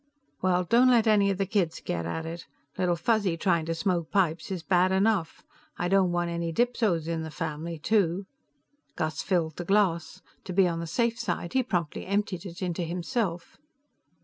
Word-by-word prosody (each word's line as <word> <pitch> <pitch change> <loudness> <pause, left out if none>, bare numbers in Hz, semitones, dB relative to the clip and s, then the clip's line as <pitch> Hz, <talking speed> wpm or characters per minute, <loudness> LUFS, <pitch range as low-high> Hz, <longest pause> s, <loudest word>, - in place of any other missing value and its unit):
"Well, 180 -1 +2
don't 235 +8 +4
let 235 -3 +4
any 210 -2 +4
of 195 - 0
the 195 - 0
kids 185 -5 0
get 85 -1 -3
at 160 - -3
it. 165 +1 -7 0.3
Little 180 -2 +1
Fuzzy 190 0 +1
trying 170 -2 +1
to 165 - -1
smoke 170 -2 -1
pipes 170 -4 +1
is 185 -4 -4
bad 180 +1 +3
enough; 190 -3 +1 0.3
I 175 - -1
don't 190 -2 +3
want 175 0 -1
any 170 0 -2
dipsos 215 -6 +1
in 165 -1 -2
the 160 - -5
family, 160 +1 -4
too." 190 +1 +1 0.7
Gus 155 -1 -2
filled 165 -5 0
the 175 - -3
glass. 185 -3 +1 0.2
To 185 - -5
be 190 0 +4
on 165 -1 -2
the 170 - -4
safe 235 +7 0
side, 175 -7 -3
he 260 - +3
promptly 180 - -2
emptied 200 -2 -1
it 175 +2 -7
into 180 -1 -2
himself. 175 +1 -3
180 Hz, 185 wpm, -27 LUFS, 165-200 Hz, 0.7 s, don't